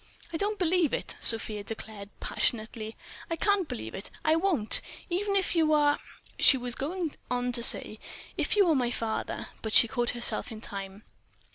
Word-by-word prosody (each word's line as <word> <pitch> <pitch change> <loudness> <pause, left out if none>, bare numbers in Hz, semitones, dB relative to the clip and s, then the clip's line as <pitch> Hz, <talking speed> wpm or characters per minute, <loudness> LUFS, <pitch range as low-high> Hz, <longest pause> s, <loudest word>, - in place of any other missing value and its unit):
"I - - -1
don't 415 +4 -1
believe 355 -4 +1
it!" - - -5
Sofia 220 -2 +5
declared, 210 -1 -8
passionately—"I 220 +7 -3
can't 400 -1 +1
believe 110 0 -6
it, 195 - -5 0.2
I 315 0 +4
won't! 330 - +1 0.3
Even 395 +3 -1
if 380 -2 +1
you 315 -2 +3
are—" 290 -1 +3 0.4
She 265 - +7
was 245 -1 -3
going 320 +4 -3 0.2
on 245 0 -1
to 240 -1 +1
say 215 -2 +4 0.4
"if - - -1
you 405 -2 +5
are 325 - +4
my 250 -4 +1
father," 225 -2 -4
but 220 +1 +5
caught 240 -2 -1
herself 240 0 0
in 220 - -8
time. 200 -1 -7
250 Hz, 165 wpm, -28 LUFS, 220-330 Hz, 0.4 s, She